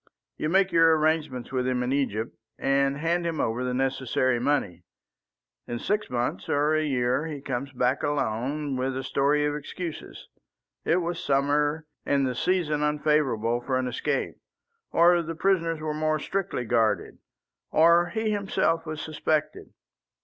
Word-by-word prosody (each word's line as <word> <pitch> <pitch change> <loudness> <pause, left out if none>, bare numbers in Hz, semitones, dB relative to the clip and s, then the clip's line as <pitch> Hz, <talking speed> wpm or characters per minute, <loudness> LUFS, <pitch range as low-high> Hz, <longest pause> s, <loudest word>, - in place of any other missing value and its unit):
You 155 - -2
make 190 +2 +3
your 165 -1 +5
arrangements 155 -5 0
with 130 -1 -1
him 125 -1 0
in 125 +2 -1
Egypt, 115 -6 -1 0.2
and 140 0 +1
hand 170 +3 0
him 165 -2 -2
over 115 +3 -1
the 125 - -1
necessary 130 -1 0
money. 125 - 0 0.9
In 120 - -3
six 210 - -1
months 120 -6 -2
or 150 +2 +2
a 155 0 +2
year 130 +1 0
he 150 -3 -5
comes 135 0 -4
back 125 +1 0
alone, 140 +1 -1
with 130 +1 -1
a 130 - -3
story 145 +2 +1
of 150 - 0
excuses. 150 - -7 0.6
It 180 +2 +2
was 170 0 -3
summer, 145 +3 +1 0.2
and 140 -1 +1
the 130 - -1
season 155 +1 0
unfavourable 150 -6 +1
for 130 +1 -1
an 130 0 -1
escape. 125 - -2 0.5
Or 175 +1 +5
the 165 0 -5
prisoners 165 -2 +1
were 155 -1 -3
more 155 0 0
strictly 195 -3 -3
guarded. 115 -1 0 0.5
Or 170 +2 +5
he 220 +3 -1
himself 190 -5 0
was 155 0 -4
suspected. 155 0 -2
145 Hz, 155 wpm, -26 LUFS, 130-165 Hz, 0.9 s, your